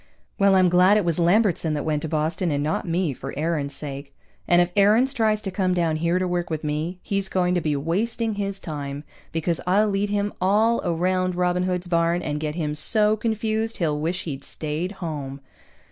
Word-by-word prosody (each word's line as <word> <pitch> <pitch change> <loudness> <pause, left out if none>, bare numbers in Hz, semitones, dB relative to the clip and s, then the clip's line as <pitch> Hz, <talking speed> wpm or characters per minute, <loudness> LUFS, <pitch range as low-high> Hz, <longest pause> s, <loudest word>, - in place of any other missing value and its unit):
Well, 200 -1 +5
I'm 185 -1 +5
glad 180 +4 +5
it 205 - +1
was 170 -1 0
Lambertson 175 -3 +2
that 145 - -3
went 150 -2 0
to 160 - -3
Boston 160 +3 -1
and 145 -1 0
not 155 +3 -2
me, 170 -3 0
for 135 +2 -8
Aarons' 150 -3 -1
sake. 140 -1 -7 0.3
And 175 - +5
if 175 0 +2
Aarons 215 +7 +4
tries 215 -4 +1
to 195 - -3
come 185 -1 0
down 165 -3 +1
here 170 +3 +1
to 185 0 0
work 175 -1 -2
with 160 -1 -3
me, 155 +4 -2
he's 195 -1 -1
going 180 -1 +1
to 175 - +1
be 150 -2 0
wasting 215 +10 -1
his 200 -1 -3
time, 145 -4 -5 0.3
because 165 +1 -1
I'll 205 +4 +3
lead 200 +1 0
him 205 0 -1
all 215 +5 +3
around 185 +2 0
Robin 180 0 +1
Hood's 180 -1 -2
Barn 170 0 +1
and 150 -1 -2
get 150 0 -3
him 155 -3 -2
so 210 +7 +2
confused 220 0 -1
he'll 155 -5 0
wish 170 +5 -2
he'd 140 -5 -6
stayed 160 +5 -3
home. 145 -7 -5
175 Hz, 205 wpm, -24 LUFS, 155-195 Hz, 0.3 s, Well